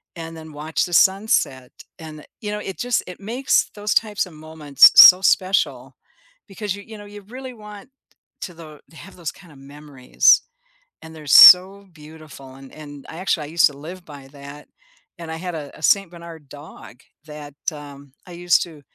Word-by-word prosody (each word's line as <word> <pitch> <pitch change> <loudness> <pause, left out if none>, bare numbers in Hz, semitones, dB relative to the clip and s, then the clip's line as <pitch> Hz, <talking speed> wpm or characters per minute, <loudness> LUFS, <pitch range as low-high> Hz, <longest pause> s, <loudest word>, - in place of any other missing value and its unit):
and 165 0 -10
then 160 -1 -13
watch 155 +2 -4
the 175 - -10
sunset 190 - 0 0.3
and, 155 -2 -12 0.2
you 210 -1 -6
know, 210 - -5
it 190 -2 -9
just, 245 -1 -2
it 180 - -11
makes 240 +7 -2
those 205 0 -4
types 210 -4 -2
of 180 - -16
moments 155 -2 +3
so 180 0 +8
special 190 0 -1 0.5
because 200 0 -6
you 200 - -13
you 220 -1 -13
know, 205 - -13
you 205 0 -13
really 255 +5 -11
want 210 0 -14 0.5
to 180 - -8
the 155 -3 -15
have 185 +4 -15
those 170 -3 -7
kind 175 -4 -19
of 135 - -19
memories. 140 -2 0 0.6
And 160 - -13
they're 155 -2 -14
so 190 +6 +6
beautiful 150 -4 -15
and 135 -1 -16
and 145 -2 -13
I 160 - -11
actually, 180 -4 -3
I - - -13
used 170 0 +2
to 140 - -3
live 175 +5 -12
by 140 -3 -14
that 140 +1 -14 0.5
and 165 -1 -10
I - - -6
had 180 0 -8
a 145 -2 -9
a - - -18
Saint 195 +1 +1
Bernard 165 -4 -14
dog 145 -4 -15 0.3
that, 150 -2 -12 0.2
um, 140 -2 -14
I - - -15
used 175 0 0
to 160 -4 -16
160 Hz, 185 wpm, -19 LUFS, 145-195 Hz, 0.6 s, so